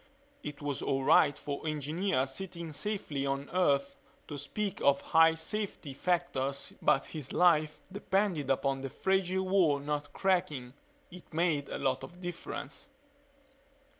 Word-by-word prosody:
It 145 0 -7
was 145 -2 -2
all 135 0 0
right 145 +1 +5
for 145 +2 -5
engineers 150 -1 0
sitting 170 -3 -6
safely 150 -4 -2
on 140 0 -2
Earth 140 -6 +2 0.3
to 150 - -4
speak 185 +8 -3
of 140 0 +4
high 165 0 +5
safety 165 -4 -3
factors 140 -4 -1
but 135 - +3
his 150 -5 -7
life 155 -4 +3
depended 195 -6 0
upon 135 0 +1
the 135 - -4
fragile 190 +3 0
wall 180 -7 +4
not 145 0 -3
cracking. 175 -11 0 0.4
It 180 0 -13
made 160 -3 +1
a - - -3
lot 130 -2 0
of 175 0 -10
difference. 175 - -6
155 Hz, 135 wpm, -31 LUFS, 140-180 Hz, 0.4 s, right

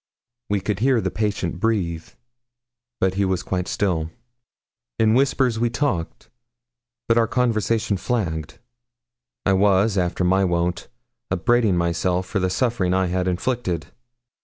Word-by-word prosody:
We 100 -1 0
could 100 0 -2
hear 130 +1 +3
the - - -2
patient 100 -5 -2
breathe; 90 -7 -1 0.9
but 95 -1 +2
he 100 +1 0
was 95 -2 0
quite 90 -1 -2
still. 85 -6 -1 0.9
In 110 -1 +3
whispers 130 -2 +2
we 120 0 +2
talked; 115 - -3 0.8
but 115 0 +4
our 115 - +2
conversation 115 -3 0
flagged. 85 -9 -2 0.9
I 95 - +3
was, 100 +1 +3
after 90 0 -1
my 95 +2 +3
wont, 90 -1 -1 0.4
upbraiding 105 +1 +2
myself 85 +2 0
for 100 +2 -2
the 95 0 +1
suffering 95 -2 0
I 95 0 +2
had 90 0 0
inflicted. 90 -4 -2
95 Hz, 135 wpm, -22 LUFS, 90-115 Hz, 0.9 s, but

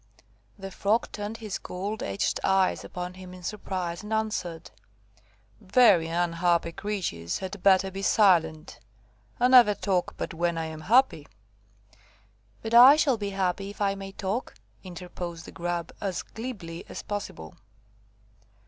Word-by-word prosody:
The 195 -1 -8
Frog 210 +5 0
turned 210 +2 -5
his 215 -4 -5
gold 200 +4 -5
edged 100 0 -1
eyes 190 -1 +2
upon 180 0 -6
him 185 0 -11
in 180 - -13
surprise, 185 -3 -4
and 210 +1 -9
answered– 190 -7 -3 0.9
"Very 190 -5 +4
unhappy 170 0 +1
creatures 165 - -3
had 190 0 -7
better 190 0 +4
be 195 +1 -6
silent. 165 -7 +2 0.6
I 245 - +4
never 245 -5 +7
talk 190 -3 -1
but - - -4
when 170 0 -1
I 165 - -2
am 160 -1 -7
happy." 215 - +3 1.4
"But 225 +1 -4
I 250 +4 +10
shall 290 -5 +2
be 205 -1 -3
happy 195 0 -2
if 205 - -11
I 200 -1 +1
may 195 0 -8
talk," 200 +7 -3 0.3
interposed 175 -2 -7
the - - -10
Grub, 170 -1 -3
as 195 -3 -2
glibly 200 -9 -7
as - - -7
possible. 200 - -6
190 Hz, 140 wpm, -27 LUFS, 170-210 Hz, 1.4 s, I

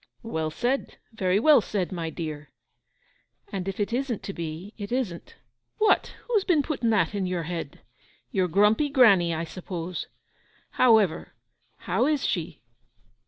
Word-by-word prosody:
'Well 160 -9 -2
said—very 220 - -1
well 295 +1 +6
said, 200 -3 -2
my 170 -3 -3
dear.' 155 -2 -6 1.0
'And 195 -2 -4
if 195 +1 -4
it 205 +2 -1
isn't 250 -3 -2
to 195 - -5
be 170 +5 -6
it 205 -1 -7
isn't.' 240 -9 -3 0.4
'What? 430 -1 +2
Who's 440 -5 +2
been 325 -7 +2
putting 260 -7 -1
that 215 -1 +2
into 195 -3 -1
your 175 -2 -2
head? 170 0 -6 0.5
Your 185 -2 +1
grumpy 210 - +3
granny, 210 - +5
I 165 0 -2
suppose. 175 +1 -6 0.6
However, 220 -9 +3 0.5
how 255 - +1
is 300 -4 +1
she? 170 - -3
195 Hz, 140 wpm, -26 LUFS, 170-240 Hz, 1.0 s, well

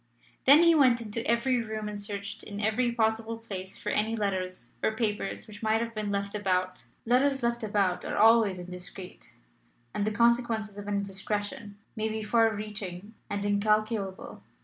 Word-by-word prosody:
Then 290 +5 +8
he 335 -1 +7
went 260 -6 +5
into 230 0 -4
every 235 +2 +2
room 215 -1 -4
and 210 -1 -5
searched 205 +1 -6
in 205 -1 -7
every 220 +4 +1
possible 225 -1 0
place 195 -4 -7
for - - -4
any 220 +2 +1
letters 185 - -3
or 220 - +1
papers 210 -3 -2
which 205 -1 -12
might 220 0 +2
have 230 0 -3
been 215 -2 -3
left 200 0 -2
about. 185 -3 -1 0.2
Letters 265 +2 +3
left 235 0 0
about 200 -4 +1
are - - -3
always 220 -3 +5
indiscreet, 180 +1 -7 0.6
and 205 - -1
the 215 - +1
consequences 230 -2 +1
of 205 - -8
an 205 - -1
indiscretion 205 +1 -3 0.2
may 220 0 -1
be 220 0 -3
far 225 +1 +3
reaching 205 -2 -5 0.2
and 205 0 -2
incalculable. 205 -1 0
215 Hz, 170 wpm, -29 LUFS, 200-230 Hz, 0.6 s, Then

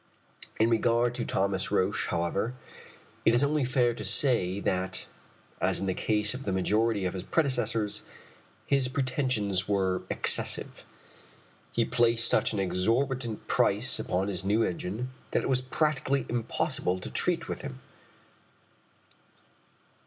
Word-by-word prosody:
In 115 +2 +4
regard 115 +1 +2
to - - -3
Thomas 95 0 0
Roch, 100 0 +1
however, 85 +8 -1 0.7
it 115 - +4
is 120 - +3
only 145 0 +2
fair 125 -2 +2
to 110 - -7
say 100 -3 +2
that, 95 -1 -1 0.6
as - - +1
in - - -2
the 95 - 0
case 105 +2 +1
of 130 - -6
the 100 - -3
majority 105 +2 +1
of 90 - -1
his 95 - -4
predecessors, 115 - 0 0.6
his 135 -2 +2
pretensions 125 -8 0
were 95 -2 +1
excessive. - - 0 0.9
He 115 - +1
placed 115 -2 +2
such - - +3
an 110 - -3
exorbitant 115 +6 0
price - - +2
upon 95 +2 -1
his 95 -2 -2
new 105 +4 +2
engine 105 +8 -3 0.2
that - - 0
it - - -2
was 130 -1 +2
practicably 140 0 0
impossible 115 -5 -1
to 90 -8 -7
treat - - 0
with - - -4
him. 65 0 -7
110 Hz, 140 wpm, -28 LUFS, 95-125 Hz, 0.9 s, In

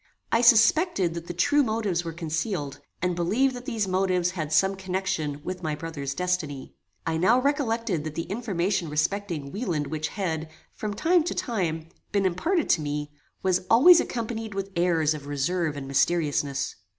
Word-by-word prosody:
I 230 - +3
suspected 230 - +4
that 170 0 -7
the 175 - -4
true 290 +11 +3
motives 215 -8 0
were 165 - -4
concealed, 160 -2 -3 0.2
and 180 -1 +1
believed 235 +10 +1
that 245 0 -8
these 225 -6 -1
motives 185 -1 +1
had 155 -5 -4
some 190 +5 +3
connection 180 -6 -3
with 185 0 -5
my 155 -3 -2
brother's 145 -4 -5
destiny. 180 -6 -2 0.3
I 160 0 0
now 190 +9 +4
recollected 230 - 0
that 155 -1 -5
the 165 - -2
information 195 -4 -1
respecting 155 -1 -2
Wieland 180 -9 -2
which 155 +1 -3
had, 160 -5 -3 0.2
from 210 -1 -4
time 345 - +3
to - - -2
time, 165 -8 -2 0.2
been 200 -2 +1
imparted 305 - +1
to 160 - +3
me, 150 0 -3 0.3
was 185 -1 +2
always 330 +10 +8
accompanied 225 -3 -3
with 195 0 -4
airs 165 -3 +2
of 145 -2 -8
reserve 150 +2 -1
and 135 -1 -6
mysteriousness. 145 -1 0
180 Hz, 165 wpm, -26 LUFS, 155-215 Hz, 0.3 s, always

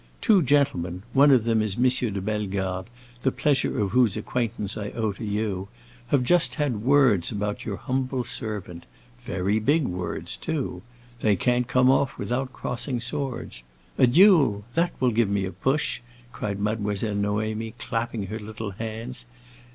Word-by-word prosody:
"Two 210 -6 +4
gentlemen—one 135 - +2
of 130 -5 +5
them 115 -1 +2
is 105 -3 -1
M. 125 +1 +4 0.2
de 100 - -3
Bellegarde, 95 -2 -2 0.3
the 130 - +2
pleasure 140 -2 +1
of 100 -3 0
whose 120 -4 +3
acquaintance 110 -5 -2
I 105 -2 -4
owe 110 -2 0
to 100 +4 -9
you—have 120 +5 -3
just 130 -4 +3
had 135 -8 -1
words 125 -8 +4
about 105 -1 -3
your 105 - -3
humble 130 +4 -2
servant. 105 -8 -4 0.4
Very 100 -2 0
big 145 +8 +2
words 90 -3 -3
too. 160 -5 -3 0.4
They 105 -3 +3
can't 125 +5 +1
come 125 0 +4
off 135 0 +1
without 130 +2 -2
crossing 125 +1 -3
swords. 125 - -4 0.4
A 130 - +7
duel—that 150 - +4
will 125 -1 +3
give 115 -2 +2
me 100 -1 0
a 95 - -4
push!" 135 +4 0 0.3
cried 100 -4 -4
Mademoiselle 105 0 -1
Noémie 110 +2 -2
clapping 115 -3 -3
her 110 +3 -5
little 110 0 -6
hands. 115 +4 -6
115 Hz, 150 wpm, -25 LUFS, 105-130 Hz, 0.4 s, A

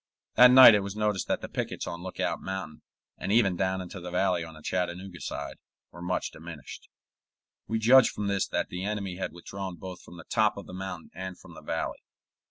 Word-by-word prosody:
That 125 +2 +9
night 130 -2 +11
it 105 - +4
was 100 0 -5
noticed 105 -3 0
that - - 0
the - - -5
pickets - - -4
on 85 0 -6
Lookout 95 +1 -3
Mountain, 95 -5 -5 0.4
and - - -3
even 105 -4 +4
down 95 +1 0
into 95 +1 -8
the 90 0 -7
valley 90 -1 +1
on 80 -1 -10
the 80 - -14
Chattanooga 90 0 -3
side, - - -5 0.3
were 85 - -11
much 90 +1 -2
diminished. 80 -3 -10 0.8
We 110 - 0
judged 120 +3 +6
from 105 - -4
this 100 -1 0
that - - -2
the 90 +1 -5
enemy 100 -3 -3
had 95 - -3
withdrawn 95 +2 -7
both 90 +1 -9
from 85 - -13
the 85 - -10
top 110 -3 +2
of 100 - -7
the - - -11
mountain 95 -3 -6
and 95 +1 -6
from - - -14
the - - -11
valley. - - -3
95 Hz, 210 wpm, -28 LUFS, 90-100 Hz, 0.8 s, night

